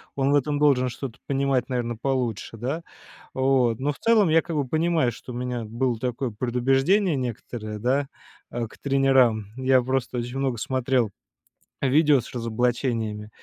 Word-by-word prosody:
Он 135 0 +1
в - - +4
этом 145 +1 +1
должен 135 -4 +3
что-то 125 -1 -7
понимать, 135 -2 0
наверное, 120 -2 -2
получше, 125 -5 -2
да? 135 +9 -3 0.5
Вот. 130 -4 +2
Но 140 +3 0
в - - -11
целом 220 -5 +4
я 165 +1 +5
как 165 -1 -5
бы 145 -3 0
понимаю, 160 -2 +1
что 125 +2 -10
у - - -7
меня 125 -1 -3
было 120 +1 -1
такое 125 +1 -2
предубеждение 135 - +2
некоторое, 115 -3 -5
да, 135 +5 +1 0.4
э, 120 -1 -3
к - - -17
тренерам. 135 -6 +3
Я 130 0 +3
просто 130 0 -2
очень 120 +2 -3
много 135 -3 0
смотрел 125 -1 0 0.7
видео 145 0 +4
с - - -12
разоблачениями 115 -2 -1
130 Hz, 160 wpm, -25 LUFS, 120-140 Hz, 0.7 s, я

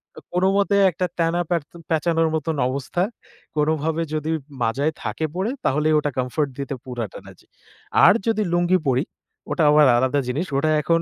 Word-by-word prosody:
কো - - -9
কোনোমতে 195 +2 +2 0.2
একটা 180 +3 -2
ত্যানা 170 +1 +1
পেরত 170 -4 -2 0.2
পেচানোর 165 0 +1
মতন 160 +1 -2
অবস্থা। 140 +7 -2 0.5
কোনভাবে 155 +2 0
যদি 155 +1 -2 0.3
মাজায় 140 +7 0
থাকে 160 - -2
পড়ে, 195 +6 -1
তাহলেই 150 +3 +2
ওটা 145 -1 -2
কমফোর্ট 135 +3 -1
দিতে 140 0 -3
পুরাটা 120 -5 -5
না - - -11
জি। - - -23 0.6
আর - - +8
যদি 215 -1 +2
লুঙ্গি 175 +1 +3
পড়ি, 130 +2 +2 0.5
ওটা 165 - +1
আবার 150 0 +6
আলাদা 130 +3 +1
জিনিস। 155 +9 -2
ওটা 155 +2 +2
এখন 165 +3 +2
155 Hz, 165 wpm, -22 LUFS, 140-175 Hz, 0.6 s, আর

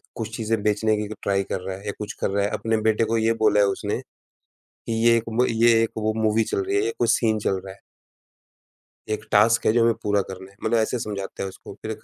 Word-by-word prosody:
कुछ 110 0 -5
चीज़ें 110 -1 -1
बेचने 105 +1 +2
की 105 -1 -3
क - - -14
ट्राई 100 -1 +1
कर 95 - -2
रहा 95 0 -5
है 100 - -14
या 100 - -1
कुछ 105 0 -5
कर - - +1
रहा 100 0 +1
है, - - 0
अपने 115 0 0
बेटे 110 0 +2
को 115 +1 0
ये 115 +1 +2
बोला 105 -1 +4
है 100 - +5
उसने, 95 - -2 0.7
कि 115 - -9
ये 115 0 +6
एक 115 - -1
वो 120 +3 +2
ये 115 +1 +4
एक 115 - 0
वो 110 0 0
मूवी 110 +1 +3
चल 390 - -1
रही 395 +1 -1
है, 405 - +2
ये 440 - -1
कोई - - +1
सीन 110 -2 +2
चल 95 -2 0
रहा 95 - -8
है। - - -24 1.3
एक 110 0 -3
टास्क 115 +3 +4
है - - +5
जो 120 - +3
हमें 115 0 +4
पूरा 105 -1 +2
करना 95 0 -9
है 100 - -23
मतलब 120 - +2
ऐसे 115 +2 0
समझाते 100 -3 -5
है 95 - -3
उसको, - - -11
फिर - - -4
110 Hz, 260 wpm, -24 LUFS, 100-115 Hz, 1.3 s, ये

